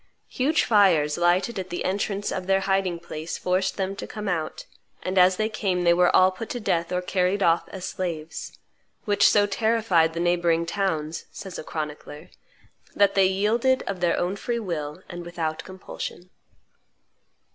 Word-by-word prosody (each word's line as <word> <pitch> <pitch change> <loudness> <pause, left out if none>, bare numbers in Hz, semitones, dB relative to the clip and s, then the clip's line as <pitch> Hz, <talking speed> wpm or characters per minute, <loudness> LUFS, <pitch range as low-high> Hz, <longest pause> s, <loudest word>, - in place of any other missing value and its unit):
Huge 290 +5 +1
fires 175 -9 +4
lighted 180 +5 +1
at 185 0 -6
the 175 - -4
entrance 200 +1 -1
of 185 -1 -4
their 195 0 +3
hiding 195 -2 0
place 165 -1 -6
forced 185 +1 0
them 195 0 -2
to - - -6
come 210 -1 -6
out, 165 -4 -3 0.4
and 185 - -2
as 185 0 +5
they 215 - +1
came 190 -5 -1
they 170 0 +5
were 180 0 +4
all 185 0 +6
put 205 +4 -7
to 245 - -3
death 170 -5 -1
or 180 0 -1
carried 185 +2 +1
off 165 0 +2
as 190 -2 -7
slaves; 165 -4 -5 0.5
"which 205 -1 +4
so 205 -1 +4
terrified 205 -6 +2
the - - -2
neighboring 170 -1 +2
towns," 165 -4 -2
says 190 -3 -8
a - - -6
chronicler, 150 +1 -7 0.6
"that 200 -1 +4
they 195 -1 +4
yielded 225 +7 +1
of 195 -2 -4
their 175 -1 +1
own 180 +2 -1
free 235 +4 -3
will 170 -5 -4
and 175 -1 -7
without 165 -2 -4
compulsion." 185 -1 -8
185 Hz, 170 wpm, -25 LUFS, 170-200 Hz, 0.6 s, all